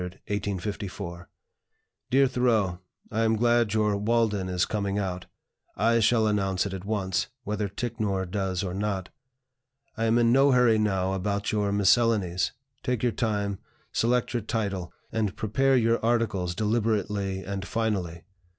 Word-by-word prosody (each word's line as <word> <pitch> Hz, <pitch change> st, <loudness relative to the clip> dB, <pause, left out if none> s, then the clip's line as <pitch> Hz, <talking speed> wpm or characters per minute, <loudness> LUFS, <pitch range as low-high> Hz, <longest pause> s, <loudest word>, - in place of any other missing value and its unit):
_ 100 Hz, -3 st, -4 dB, 0.8 s
"DEAR 135 Hz, +1 st, +5 dB
THOREAU, 115 Hz, -8 st, +1 dB, 0.3 s
I 110 Hz, -, 0 dB
am 110 Hz, 0 st, +3 dB
glad 120 Hz, -1 st, +3 dB
your 105 Hz, -1 st, +2 dB
'Walden' 105 Hz, -2 st, +1 dB
is 90 Hz, 0 st, +1 dB
coming 100 Hz, -2 st, -2 dB
out. 95 Hz, -3 st, -3 dB, 0.5 s
I 115 Hz, +3 st, +3 dB
shall 115 Hz, 0 st, +3 dB
announce 95 Hz, -3 st, +1 dB
it 100 Hz, -, -4 dB
at 95 Hz, 0 st, -6 dB
once, 95 Hz, -4 st, -1 dB, 0.2 s
whether 105 Hz, -1 st, -2 dB
Ticknor 105 Hz, -3 st, -2 dB
does 95 Hz, 0 st, -2 dB
or 90 Hz, -2 st, -3 dB
not. 100 Hz, -1 st, -2 dB, 0.9 s
I 115 Hz, -1 st, -1 dB
am 115 Hz, +1 st, +3 dB
in 115 Hz, -1 st, +4 dB
no 135 Hz, +2 st, +5 dB
hurry 120 Hz, -3 st, +4 dB
now 95 Hz, -3 st, +1 dB
about 100 Hz, +2 st, -1 dB
your 105 Hz, -2 st, 0 dB
'Miscellanies;' 100 Hz, -3 st, +2 dB, 0.3 s
take 125 Hz, -3 st, -2 dB
your 120 Hz, -, +3 dB
time, 100 Hz, -3 st, -1 dB, 0.3 s
select 120 Hz, +2 st, +1 dB
your 120 Hz, -, 0 dB
title, 100 Hz, -5 st, -3 dB, 0.2 s
and 110 Hz, -4 st, -1 dB
prepare 135 Hz, +5 st, +2 dB
your 115 Hz, -1 st, +2 dB
articles 110 Hz, -7 st, 0 dB
deliberately 105 Hz, -3 st, 0 dB
and 100 Hz, 0 st, -4 dB
finally. 95 Hz, -7 st, -2 dB
105 Hz, 140 wpm, -27 LUFS, 95-115 Hz, 0.9 s, DEAR